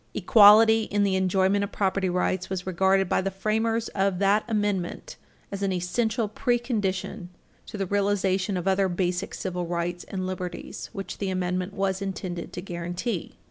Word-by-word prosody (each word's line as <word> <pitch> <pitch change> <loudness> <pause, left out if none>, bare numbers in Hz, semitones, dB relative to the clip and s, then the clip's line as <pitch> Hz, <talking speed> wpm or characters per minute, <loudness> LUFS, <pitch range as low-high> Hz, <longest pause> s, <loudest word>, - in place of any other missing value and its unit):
Equality 220 0 +7
in 205 0 0
the 195 -1 +2
enjoyment 190 +2 +2
of 200 - -4
property 190 -1 0
rights 180 +1 -1
was 185 -2 -3
regarded 190 +1 +2
by - - +1
the 195 - -1
framers 220 +3 -1
of 195 -1 0
that 200 +2 +3
Amendment 205 - -2 0.4
as 200 0 -5
an 195 -1 0
essential 215 +6 0
pre 240 +3 0
condition 205 -5 -3 0.4
to - - -7
the 195 - -1
realization 195 -1 0
of 180 +1 -4
other 190 0 +2
basic 180 +1 -2
civil 180 -2 -3
rights 175 +1 -3
and 185 -1 -4
liberties 185 -1 -6
which 195 -1 -7
the 195 - -2
Amendment 185 +1 -2
was 195 0 -1
intended 185 -3 -5
to 175 - -6
guarantee. 175 +3 -4
195 Hz, 165 wpm, -26 LUFS, 185-205 Hz, 0.4 s, Equality